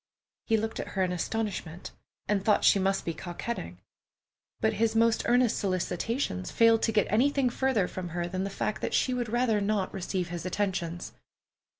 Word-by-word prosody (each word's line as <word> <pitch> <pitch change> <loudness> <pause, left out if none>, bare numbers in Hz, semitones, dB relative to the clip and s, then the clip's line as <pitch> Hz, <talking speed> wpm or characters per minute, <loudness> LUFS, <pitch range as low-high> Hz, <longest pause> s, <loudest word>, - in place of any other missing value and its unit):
He 225 - +3
looked 220 +1 -3
at - - -4
her 190 - +3
in 180 - 0
astonishment, 180 -2 -3 0.4
and 200 -1 +1
thought 210 0 +3
she 200 - +6
must 195 0 0
be 165 - -1
coquetting; 170 - -6 0.8
but 220 0 +2
his 225 -1 +2
most 230 0 +3
earnest 245 -1 +3
solicitations 185 - -2
failed 230 -1 +4
to 225 - +2
get 210 -2 +3
anything 260 +3 +3
further 240 -8 +1
from 180 -1 -6
her 175 +1 -2
than 185 +2 -3
the 195 - -2
fact 210 +2 -3
that - - -1
she 255 - +2
would 245 -2 -2
rather 235 -2 +1
not 200 -1 0
receive 185 -2 -3
his 175 -1 -5
attentions. 180 -2 -2
205 Hz, 180 wpm, -28 LUFS, 180-225 Hz, 0.8 s, she